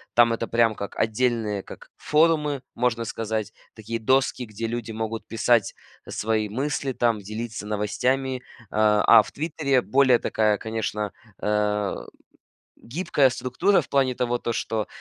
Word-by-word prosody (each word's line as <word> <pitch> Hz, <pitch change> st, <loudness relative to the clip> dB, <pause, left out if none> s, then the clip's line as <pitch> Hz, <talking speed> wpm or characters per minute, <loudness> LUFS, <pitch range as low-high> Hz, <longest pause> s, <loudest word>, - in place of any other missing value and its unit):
там 120 Hz, -1 st, +6 dB
это 115 Hz, 0 st, -3 dB
прям 115 Hz, -1 st, +3 dB
как 100 Hz, -, -6 dB
отдельные 110 Hz, -2 st, 0 dB
как -, -, -12 dB
форумы, 150 Hz, -3 st, +2 dB
можно 115 Hz, -1 st, 0 dB
сказать, 110 Hz, -1 st, -3 dB, 0.2 s
такие 115 Hz, +1 st, -5 dB
доски, 130 Hz, +2 st, +1 dB
где 110 Hz, +1 st, -6 dB
люди 115 Hz, -1 st, -4 dB
могут 110 Hz, 0 st, -4 dB
писать, 115 Hz, -2 st, +2 dB, 0.3 s
э, -, -, -10 dB
свои 110 Hz, 0 st, 0 dB
мысли 135 Hz, +3 st, -2 dB
там, 115 Hz, -3 st, +1 dB
делиться 110 Hz, +2 st, -6 dB
новостями, 125 Hz, +5 st, -1 dB, 0.3 s
а 105 Hz, -1 st, +3 dB, 0.2 s
а -, -, +4 dB
в 100 Hz, -, -11 dB
"Твиттере" 145 Hz, -4 st, 0 dB
более 130 Hz, -2 st, +4 dB
такая, 105 Hz, -1 st, +1 dB
конечно, 110 Hz, -2 st, -3 dB, 0.3 s
э, 105 Hz, -1 st, 0 dB, 0.9 s
гибкая 145 Hz, 0 st, +1 dB
структура 130 Hz, +10 st, +1 dB
в -, -, -10 dB
плане 135 Hz, -2 st, +2 dB
того, 120 Hz, 0 st, -1 dB
то, 120 Hz, -, -2 dB
что, 110 Hz, -1 st, -2 dB
115 Hz, 145 wpm, -24 LUFS, 110-130 Hz, 0.9 s, там